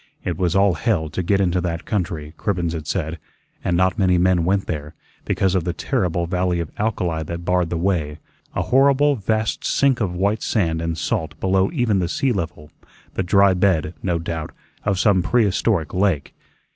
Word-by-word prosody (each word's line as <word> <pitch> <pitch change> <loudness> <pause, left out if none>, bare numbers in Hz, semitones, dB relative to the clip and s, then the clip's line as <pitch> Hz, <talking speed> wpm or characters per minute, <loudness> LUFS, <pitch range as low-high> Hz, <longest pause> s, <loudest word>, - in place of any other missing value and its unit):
It 90 - -2
was 90 +1 0
all 100 -1 +4
hell 80 -1 0
to - - -2
get 95 +3 +1
into 90 -2 +1
that 85 -1 -3
country, 80 -7 -3
Cribbens 90 -4 -1
had 80 -3 -5
said, 80 -2 -2 0.4
and 85 - +1
not 95 +4 +2
many 90 -2 +3
men 90 -1 +3
went 95 +2 +1
there, 75 -2 -5 0.3
because 95 -2 +1
of 95 -3 +1
the 85 0 -2
terrible 85 +1 -1
valley 90 0 0
of 85 -3 -4
alkali 90 -7 -1
that 85 +2 -6
barred 90 -1 +1
the 85 - -2
way, 80 -5 -1 0.4
a - - 0
horrible 140 +2 +4
vast 110 0 -1
sink 135 -4 +2
of 90 -4 -1
white 100 +4 0
sand 80 -7 0
and 85 -1 -2
salt 80 +1 -2
below 95 0 +2
even 120 - +1
the 85 -2 -1
sea 135 +7 0
level, 80 -7 -4 0.4
the - - -1
dry 100 +2 +4
bed, 90 -4 +1
no 90 -3 0
doubt, 80 -1 -4 0.3
of 100 -2 +1
some 95 -1 +3
prehistoric 100 -5 +1
lake. 90 -7 0
90 Hz, 185 wpm, -21 LUFS, 85-100 Hz, 0.4 s, all